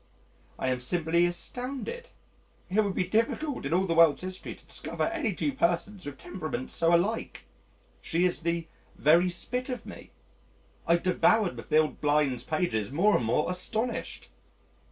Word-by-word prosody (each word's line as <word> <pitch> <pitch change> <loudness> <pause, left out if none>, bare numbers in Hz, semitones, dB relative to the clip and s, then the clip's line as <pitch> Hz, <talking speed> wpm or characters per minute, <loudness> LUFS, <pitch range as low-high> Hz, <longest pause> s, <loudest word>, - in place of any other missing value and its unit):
I 130 - -1
am 130 -1 0
simply 170 +6 +2
astounded. 265 - -5 0.6
It 210 +3 +4
would 200 -2 -2
be 185 - +1
difficult 230 - 0
in 150 - -2
all 190 +1 +2
the 170 - 0
world's 165 -1 +5
history 185 0 -5
to - - -21
discover - - -4
any 325 -9 0
two 285 - -1
persons 185 - -1
with 140 -2 -7
temperaments 155 -9 -5
so 165 +1 +3
alike. 205 +7 -1 0.6
She 170 +2 +1
is 180 - 0
the 170 0 -2 0.3
"very 170 +5 +4
spit 250 +9 -3
of 250 - -4
me - - -10 0.4
"! - - -33
I 170 - +5
devoured 185 +2 +2
Mathilde 155 0 +1
Blind's 145 -4 +2
pages 130 - -1
more 195 +9 +3
and 120 - +1
more 150 +9 +1
astonished. 220 +6 -3
175 Hz, 155 wpm, -28 LUFS, 155-215 Hz, 0.6 s, world's